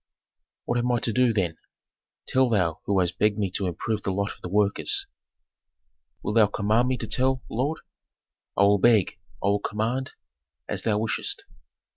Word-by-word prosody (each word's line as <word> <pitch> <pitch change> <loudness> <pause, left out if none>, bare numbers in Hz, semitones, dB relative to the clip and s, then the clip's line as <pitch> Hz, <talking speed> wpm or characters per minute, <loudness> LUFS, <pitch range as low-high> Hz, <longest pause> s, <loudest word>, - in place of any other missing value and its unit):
"What 120 - 0
am 125 +1 +1
I 120 - +2
to 115 - -1
do, 125 +1 +4
then, 90 -7 -1 0.7
tell 130 -1 +2
thou 90 -5 +1
who 100 -1 +2
hast 90 -1 0
begged 105 0 +3
me 100 -3 -1
to 95 0 -1
improve 105 +5 -2
the - - -3
lot 100 +1 -1
of - - -21
the 90 - -6
workers?" 100 +1 +1 1.2
"Wilt 105 - -1
thou 110 -2 +7
command 110 +4 +1
me 130 0 0
to - - -4
tell, 130 0 +1
lord?" 140 +7 -1 0.8
"I 100 - +5
will 100 0 +5
beg, 110 -3 +3 0.2
I 100 - +3
will 100 0 +2
command, 115 +6 -2 0.5
as - - -3
thou 105 -2 +1
wishest. 110 +1 -2
105 Hz, 175 wpm, -26 LUFS, 100-120 Hz, 1.2 s, thou